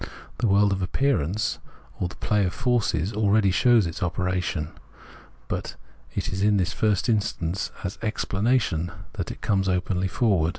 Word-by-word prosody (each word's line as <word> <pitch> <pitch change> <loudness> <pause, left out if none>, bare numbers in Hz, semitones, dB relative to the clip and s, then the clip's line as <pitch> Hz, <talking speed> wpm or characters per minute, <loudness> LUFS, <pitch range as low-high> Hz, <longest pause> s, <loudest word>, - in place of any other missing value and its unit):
The 120 - +2
world 100 0 +4
of 95 -1 -1
appearance, 100 - 0 0.4
or 90 - 0
the 95 - -10
play 105 -1 +1
of 90 - -1
forces, 110 -8 +1
aheady 105 -2 +3
shows 120 -1 +5
its 85 -1 -5
operation; 90 -3 -1 0.8
but - - -4 0.4
it - - -1
is 95 - -2
in 105 0 +4
the 95 - +2
first 105 +4 0
instance 100 -5 0
as 95 0 -4
Explanation 105 -5 0 0.2
that - - -4
it - - -8
comes 95 -2 +1
openly 90 +1 0
forward. 95 -5 +2
95 Hz, 155 wpm, -25 LUFS, 90-110 Hz, 0.8 s, shows